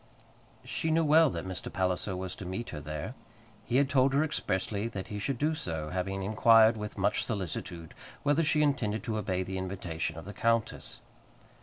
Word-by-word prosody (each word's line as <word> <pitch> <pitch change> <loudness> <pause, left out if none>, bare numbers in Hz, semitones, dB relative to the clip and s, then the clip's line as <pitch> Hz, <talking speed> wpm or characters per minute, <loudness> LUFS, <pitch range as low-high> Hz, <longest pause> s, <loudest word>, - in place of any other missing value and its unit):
She 130 +5 -2
knew 165 +1 +3
well 155 +1 +6
that 85 -6 -4
Mr. 95 -1 -5
Palliser 95 +1 0
was 90 0 -4
to - - -7
meet 95 +6 -4
her 75 - -5
there. 75 +9 -5 0.5
He 120 - -2
had 140 +1 +5
told 135 0 +3
her 145 - +4
expressly 105 -7 -1
that 100 -5 -6
he 105 - -4
should 135 +5 -2
do 150 +5 +1
so, 80 - -4
having 95 +1 -2
inquired, 110 +2 +6
with 105 -1 -6
much - - +1
solicitude, 85 -5 -4 0.3
whether 145 +3 +3
she 150 0 +3
intended 120 -7 0
to 110 -1 -2
obey 95 -2 -1
the 95 0 -4
invitation 90 -4 -3
of 80 - -8
the 100 - -7
countess. 115 +2 -1
105 Hz, 185 wpm, -30 LUFS, 95-130 Hz, 0.5 s, well